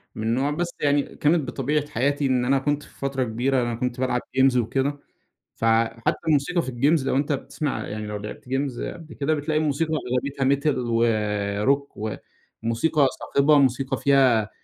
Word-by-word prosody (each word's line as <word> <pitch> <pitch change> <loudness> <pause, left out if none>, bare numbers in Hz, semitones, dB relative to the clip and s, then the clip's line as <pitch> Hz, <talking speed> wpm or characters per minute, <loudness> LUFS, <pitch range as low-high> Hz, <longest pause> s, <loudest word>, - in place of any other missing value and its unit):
من 110 +1 -1
نوع، 135 +4 +1
بس 175 +3 -2
يعني 145 0 +3
كانت 150 -1 +2
بطبيعة 145 +2 -1
حياتي 140 +4 0
إن 125 -2 +1
أنا 135 +1 +3
كنت 145 +1 -1
في - - -19
فترة 135 -1 -1
كبيرة 125 +3 0
أنا 120 -1 -1
كنت 125 +1 -3
بالعب 125 -1 0 0.2
games 130 -1 +5
وكده، 135 +5 0 0.6
فحتى 115 0 +1
الموسيقى 155 +4 +2
في - - -7
الgames 135 +3 +2
لو - - +1
أنت 145 +2 +1
بتسمع 145 +1 -3
يعني 105 0 -5
لو 105 - -4
لعبت 105 +1 -8
games 135 -1 -2
قبل 165 -3 -11
كده، 150 +2 0
بتلاقي 150 +1 -1
الموسيقى 155 +1 0
أغلبيتها 135 0 -2
metal 140 +2 +2
وrock 110 0 0 0.5
وموسيقى 140 +6 +2
صاخبة، 145 +2 +3
موسيقى 135 0 +1
فيها 130 -6 +3
135 Hz, 165 wpm, -24 LUFS, 120-145 Hz, 0.6 s, games